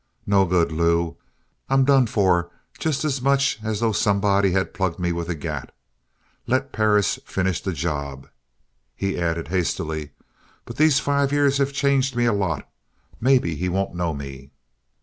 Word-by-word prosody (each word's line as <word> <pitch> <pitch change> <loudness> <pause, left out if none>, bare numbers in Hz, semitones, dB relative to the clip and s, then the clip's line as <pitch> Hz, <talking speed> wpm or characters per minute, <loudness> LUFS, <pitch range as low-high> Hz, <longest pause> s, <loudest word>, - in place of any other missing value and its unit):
No 100 -1 +3
good, 85 -2 +2
Lew. 85 +1 +1 0.5
I'm 135 0 +4
done 135 -3 +4
for 90 -5 +2 0.3
just 155 -1 -1
as 140 -4 -1
much 140 -1 +2
as 110 0 -2
though 115 -1 +2
somebody 100 -1 +2
had 95 +1 0
plugged 95 -4 -1
me 90 -1 -1
with 85 0 -4
a 85 - -1
gat. 75 - -5 0.8
Let 130 +2 0
Perris 105 -2 +2
finish 95 -2 -1
the 95 - -2
job." 70 -5 -4 0.7
He 95 -2 -2
added 85 -2 -2
hastily: 80 -4 -2 0.6
"But 120 - -9
these 155 -2 +4
five 140 -1 +1
years 140 -1 +2
have 140 0 +1
changed 140 -2 +1
me 120 0 +2
a 115 - +3
lot. 95 -7 -2 0.5
Maybe 125 -9 +3
he 90 +4 -2
won't 95 +1 -1
know 85 -1 -1
me." 70 -2 -8
100 Hz, 160 wpm, -23 LUFS, 85-130 Hz, 0.8 s, I'm